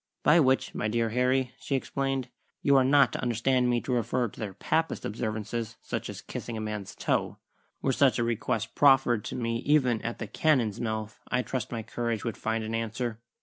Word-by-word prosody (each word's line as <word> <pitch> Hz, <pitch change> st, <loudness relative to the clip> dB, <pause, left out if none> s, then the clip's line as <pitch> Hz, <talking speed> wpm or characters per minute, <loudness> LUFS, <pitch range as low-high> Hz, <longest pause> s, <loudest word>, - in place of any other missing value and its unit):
"By 155 Hz, +3 st, +6 dB
which, 130 Hz, -3 st, +2 dB
my -, -, -1 dB
dear 115 Hz, +1 st, +1 dB
Harry," 125 Hz, +2 st, +1 dB
she 140 Hz, -, -2 dB
explained, 135 Hz, -1 st, -2 dB, 0.3 s
"you 140 Hz, -, +5 dB
are 135 Hz, -, +6 dB
not 135 Hz, -1 st, +5 dB
to -, -, -3 dB
understand 125 Hz, +1 st, +2 dB
me 120 Hz, -1 st, +2 dB
to -, -, -4 dB
refer 120 Hz, 0 st, 0 dB
to -, -, -15 dB
their 100 Hz, -4 st, -5 dB
Papist 160 Hz, +9 st, -1 dB
observances, 110 Hz, +1 st, -3 dB
such -, -, -4 dB
as -, -, -7 dB
kissing 115 Hz, -, -6 dB
a -, -, -3 dB
man's 105 Hz, -2 st, -5 dB
toe. -, -, -1 dB, 0.5 s
Were 135 Hz, -, +2 dB
such 135 Hz, 0 st, +4 dB
a 120 Hz, -, +1 dB
request 115 Hz, -1 st, -1 dB
proffered 135 Hz, -6 st, +4 dB
to -, -, -4 dB
me 115 Hz, -1 st, -1 dB
even 130 Hz, -5 st, +2 dB
at 115 Hz, -, -4 dB
the -, -, -4 dB
cannon's 120 Hz, -3 st, +1 dB
mouth, 110 Hz, -2 st, -3 dB
I 125 Hz, -, 0 dB
trust 125 Hz, -3 st, -3 dB
my 115 Hz, -2 st, -3 dB
courage 115 Hz, 0 st, -2 dB
would 115 Hz, -, -2 dB
find 110 Hz, 0 st, -2 dB
an 110 Hz, +1 st, -4 dB
answer. 115 Hz, 0 st, -2 dB
120 Hz, 200 wpm, -28 LUFS, 110-130 Hz, 0.5 s, By